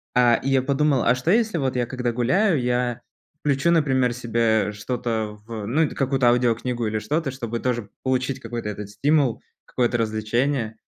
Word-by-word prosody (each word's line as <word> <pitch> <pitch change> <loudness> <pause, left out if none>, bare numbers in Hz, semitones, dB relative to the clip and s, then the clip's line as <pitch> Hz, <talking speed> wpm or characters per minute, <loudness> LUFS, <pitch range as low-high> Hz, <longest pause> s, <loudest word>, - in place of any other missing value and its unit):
а, 120 -1 +5
и 135 - -3
я 135 -1 +3
подумал: 140 -1 +1
"А 120 - +4
что 130 +7 0
если 220 -3 +2
вот 135 -4 -1
я 125 -1 +1
когда 125 -2 -2
гуляю, 160 - +2
я 125 -1 -1 0.4
включу, 145 +3 +2
например, 130 -7 +2
себе 115 -3 +1
что-то 110 -1 -3
в 110 -2 -6
ну, 150 +8 +2
и 155 - +2
т - - -10
какую-то 135 -2 +2
аудиокнигу 120 -1 +1
или 110 0 -1
что-то, 145 +7 -1
чтобы 120 -3 -4
тоже 120 -5 -2
получить 130 0 -1
какой-то 115 -2 -5
этот 105 -1 -6
стимул, 135 +2 +1 0.2
какое-то 120 -1 0
развлечение?" 115 +2 -1
125 Hz, 175 wpm, -23 LUFS, 115-135 Hz, 0.4 s, а